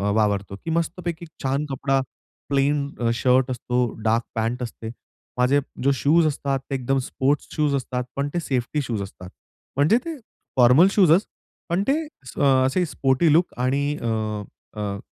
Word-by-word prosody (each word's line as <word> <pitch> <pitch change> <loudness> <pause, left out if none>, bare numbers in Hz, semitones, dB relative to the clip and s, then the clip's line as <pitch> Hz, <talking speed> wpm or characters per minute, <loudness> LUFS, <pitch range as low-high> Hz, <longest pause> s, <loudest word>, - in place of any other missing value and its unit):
वावरतो 100 -2 0
की - - -3
मस्तपैकी 170 0 -4 0.2
छान 135 +2 0
कपडा, 135 0 0 0.5
प्लेन 140 +1 +1
अ, 120 -1 +1
शर्ट 130 0 +3
असतो, 125 0 0 0.2
डार्क 115 +2 +2
पँट 115 +3 -1
असते. 115 -1 -6 0.5
माझे 125 +3 +4 0.2
जे 140 - +4
शूज 155 +6 +3
असतात, 140 -2 -1
ते 135 - -1
एकदम 135 +1 0
स्पोर्ट्स 135 +2 -1
शूज 150 -2 +2
असतात, 125 -1 -2
पण 140 +1 -1
ते 175 - 0
सेफ्टी 135 -1 -1
शूज 115 -6 -3
असतात. 90 -2 -9 0.5
म्हणजे 150 +11 +4
ते 330 -2 -4 0.4
फॉर्मल 125 +8 +7
शूजच 190 -1 +5 0.4
पण 175 +3 +1
ते - - +4 0.5
अ, - - -1 0.2
असे 155 +8 +1
स्पोर्टी 140 +1 +2
लूक 170 +3 +3
आणि 130 +3 +1 0.2
अ, 110 -2 -2 0.4
अ, 100 -1 -2
135 Hz, 155 wpm, -23 LUFS, 120-150 Hz, 0.5 s, फॉर्मल